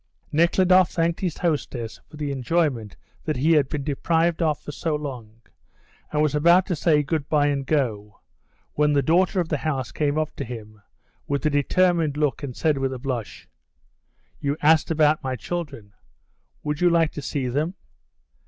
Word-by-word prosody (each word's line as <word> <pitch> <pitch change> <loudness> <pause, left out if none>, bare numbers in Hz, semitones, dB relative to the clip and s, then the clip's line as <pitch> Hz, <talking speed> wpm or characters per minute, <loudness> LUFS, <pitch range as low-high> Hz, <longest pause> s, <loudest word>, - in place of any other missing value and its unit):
Nekhludoff 180 +3 +4
thanked 165 0 0
his 180 -5 -2
hostess 135 -8 -2
for 155 - -12
the 150 -1 -3
enjoyment 135 -5 -1 0.3
that 155 - -1
he 150 +6 +2
had 150 -4 +3
been 145 -2 -3
deprived 165 +4 0
of 155 -3 +2
for - - -8
so 155 +1 -2
long, 120 -7 -7 0.7
and 150 0 +1
was 150 -2 +1
about 170 +5 +5
to 180 - -2
say 150 -1 +2
goodbye 150 0 0
and 140 -2 -1
go 110 -8 -1 0.5
when 150 0 +2
the 140 -1 +2
daughter 180 +6 +2
of 170 -2 -1
the 150 - 0
house 135 -7 -2
came 150 -1 -1
up 155 -1 -2
to - - -3
him 110 -3 -9 0.5
with 140 +1 -2
a 155 - +3
determined 160 +1 +2
look 150 -1 0
and 135 -4 -6
said, 155 -4 +1
with 135 0 -1
a - - -5
blush, 125 -4 -5 0.9
"You 140 +1 -1
asked 155 +1 +4
about 155 -1 +2
my 130 -1 -2
children. 140 -10 -6 0.7
Would 150 +1 -3
you 175 - +5
like 165 -2 +3
to 145 - -6
see 135 -2 -2
them?" 150 +8 -1
150 Hz, 175 wpm, -24 LUFS, 135-165 Hz, 0.9 s, about